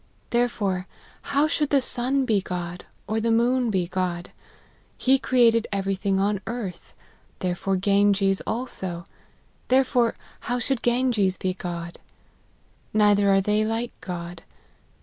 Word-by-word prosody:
Therefore 205 Hz, -6 st, 0 dB, 0.3 s
how 285 Hz, +2 st, +1 dB
should 300 Hz, -2 st, 0 dB
the 280 Hz, -, +4 dB
sun 260 Hz, +1 st, +1 dB
be 215 Hz, -5 st, +2 dB
God, 180 Hz, -1 st, -5 dB, 0.2 s
or 220 Hz, +2 st, -1 dB
the 230 Hz, -, 0 dB
moon 240 Hz, +2 st, +2 dB
be 185 Hz, -4 st, 0 dB
fcod? 180 Hz, -1 st, -3 dB, 0.7 s
He 265 Hz, +1 st, +3 dB
created 235 Hz, -4 st, +3 dB
every 195 Hz, -1 st, -1 dB
thing 195 Hz, 0 st, 0 dB
on 200 Hz, 0 st, 0 dB
earth; 215 Hz, -7 st, -6 dB, 0.4 s
therefore 185 Hz, +1 st, -1 dB
Ganges 195 Hz, 0 st, +2 dB
also: 190 Hz, -8 st, -4 dB, 0.6 s
there 260 Hz, +1 st, +5 dB
fore 245 Hz, -3 st, +1 dB, 0.2 s
how 245 Hz, -, -2 dB
should 250 Hz, +1 st, -1 dB
Ganges 240 Hz, -6 st, +1 dB
be 185 Hz, -1 st, -1 dB
God? 170 Hz, -2 st, -6 dB, 1.0 s
Neither 205 Hz, -1 st, +4 dB
are 195 Hz, 0 st, +4 dB
they 210 Hz, +2 st, +1 dB
like 225 Hz, +2 st, -2 dB
God. 175 Hz, -2 st, -6 dB
205 Hz, 130 wpm, -25 LUFS, 185-240 Hz, 1.0 s, there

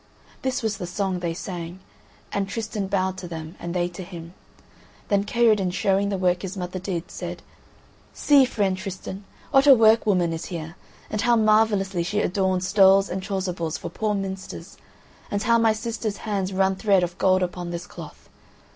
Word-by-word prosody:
This 260 Hz, -2 st, -2 dB
was 215 Hz, -2 st, -1 dB
the 180 Hz, -, -5 dB
song 190 Hz, 0 st, -2 dB
they 170 Hz, -2 st, -3 dB
sang. 175 Hz, -1 st, -6 dB, 0.5 s
And 200 Hz, -1 st, -1 dB
Tristan 210 Hz, -2 st, -3 dB
bowed 190 Hz, -1 st, -1 dB
to 180 Hz, -, -7 dB
them, 160 Hz, 0 st, -7 dB
and 170 Hz, -, -5 dB
they 175 Hz, -1 st, +1 dB
to 175 Hz, +1 st, -9 dB
him. 175 Hz, -2 st, -9 dB, 0.8 s
Then 200 Hz, -1 st, +2 dB
Kaherdin, 215 Hz, -4 st, +3 dB
showing 195 Hz, +2 st, +1 dB
the 200 Hz, -, -1 dB
work 180 Hz, -1 st, +1 dB
his 195 Hz, 0 st, -6 dB
mother 180 Hz, 0 st, -4 dB
did, 180 Hz, -2 st, -4 dB
said: -, -, -6 dB, 0.7 s
"See, 285 Hz, -2 st, +5 dB
friend 200 Hz, -6 st, 0 dB
Tristan, 190 Hz, 0 st, -7 dB, 0.3 s
what 275 Hz, 0 st, +5 dB
a 275 Hz, -, +10 dB
work 225 Hz, -1 st, +5 dB
woman 180 Hz, -5 st, +2 dB
is 165 Hz, -, -5 dB
here, 165 Hz, -1 st, -6 dB, 0.4 s
and 215 Hz, -, -1 dB
how 240 Hz, +2 st, +4 dB
marvellously 215 Hz, -4 st, +3 dB
she 205 Hz, +5 st, -1 dB
adorns 185 Hz, -1 st, 0 dB
stoles 195 Hz, -1 st, +5 dB
and 190 Hz, +1 st, -3 dB
chasubles 185 Hz, -4 st, -3 dB
for -, -, -6 dB
the -, -, -20 dB
poor 215 Hz, -1 st, +1 dB
minsters, 190 Hz, -1 st, -6 dB, 0.5 s
and 205 Hz, +1 st, -1 dB
how 230 Hz, -1 st, +4 dB
my 225 Hz, -1 st, +4 dB
sister's 220 Hz, -1 st, -3 dB
hands 195 Hz, -3 st, -1 dB
run 190 Hz, 0 st, +2 dB
thread 195 Hz, -3 st, +3 dB
of 175 Hz, +1 st, -4 dB
gold 185 Hz, -1 st, +3 dB
upon 175 Hz, -1 st, -4 dB
this 170 Hz, 0 st, -5 dB
cloth. -, -, -11 dB
190 Hz, 180 wpm, -24 LUFS, 180-210 Hz, 0.8 s, a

